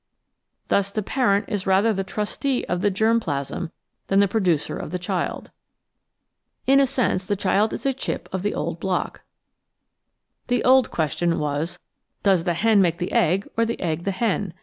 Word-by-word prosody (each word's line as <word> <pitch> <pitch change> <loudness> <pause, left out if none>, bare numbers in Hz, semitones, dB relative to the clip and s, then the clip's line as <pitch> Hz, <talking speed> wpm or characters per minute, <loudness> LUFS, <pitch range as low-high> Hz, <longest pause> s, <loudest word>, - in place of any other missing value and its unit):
Thus 200 0 +2
the 215 +1 -2
parent 205 -4 +1
is 200 -2 -3
rather 195 +4 +4
the 195 -1 -2
trustee 220 +7 -2
of 180 0 -1
the 205 - +3
germ 220 +4 +2
plasm 145 -1 -4 0.4
than 195 - +3
the 200 - +5
producer 185 -7 0
of - - -6
the 180 - -2
child. 180 0 -3 1.1
In 275 +1 +5
a - - +6
new - - +5
sense 240 -8 0
the 205 - +1
child 200 +3 +1
is - - -6
a 270 - +2
chip 265 - -4
of 190 - -1
the 205 +2 -1
old 165 +2 -3
block. 185 0 -2 1.3
The 245 0 +1
old 260 -1 +5
question 165 +2 0
was: 150 +3 -2 0.5
Does 190 -4 +3
the 175 -2 +1
hen 215 +2 +4
make 170 -2 +2
the 175 +1 -3
egg, 185 +4 +2
or 230 - +2
the 230 0 -2
egg 170 -1 -2
the - - +1
hen? 200 -3 -1
195 Hz, 185 wpm, -23 LUFS, 175-220 Hz, 1.3 s, a